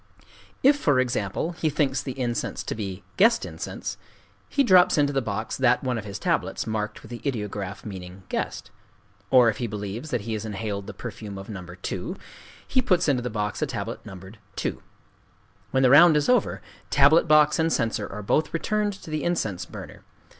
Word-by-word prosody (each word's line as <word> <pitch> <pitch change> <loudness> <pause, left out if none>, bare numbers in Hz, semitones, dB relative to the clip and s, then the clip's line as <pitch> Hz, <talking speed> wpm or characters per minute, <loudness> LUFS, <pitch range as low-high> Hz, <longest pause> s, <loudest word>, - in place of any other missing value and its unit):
If, 280 +2 +6
for 145 - +2
example, 125 - -1
he 165 -2 -1
thinks 145 -2 0
the 130 -1 -6
incense 120 -2 -2
to - - -3
be 100 -3 -5
"guest 230 +4 +4
incense," - - -6 0.5
he 280 - +2
drops 185 -9 +6
into 145 -1 +3
the 135 - +1
box 110 -1 -3
that 125 0 +3
one 125 -3 -1
of 110 - -8
his 100 -1 -5
tablets - - -1
marked 110 -1 -3
with - - -13
the 120 - -7
ideograph 105 -7 -4
meaning 95 -2 -8
"guest;" - - -4 0.6
or 125 -2 +6
if 110 -1 +1
he 120 - -2
believes 105 +6 -5
that 125 -5 -1
he 110 +2 -4
has 110 - -3
inhaled 100 -2 -4
the - - -7
perfume 105 -3 -7
of 95 +2 -9
No. 95 -4 -6 0.2
2, - - -4 0.5
he 260 - +2
puts 180 -7 +2
into 135 -4 +2
the 125 - -3
box 105 -2 -3
a - - +1
tablet - - -5
numbered 95 +3 -11 0.2
"2." - - -3 0.9
When 130 0 +2
the 125 - +6
round 155 +2 +8
is 145 - +1
over, 250 -4 +2 0.3
tablet 145 +4 +5
box 150 +1 +5
and 165 0 +2
censer 115 -5 0
are 105 +1 -6
both 155 +11 +1
returned 210 +4 0
to 155 - -9
the 155 -1 -2
incense 110 - -1
burner. - - -10
120 Hz, 190 wpm, -25 LUFS, 105-155 Hz, 0.9 s, round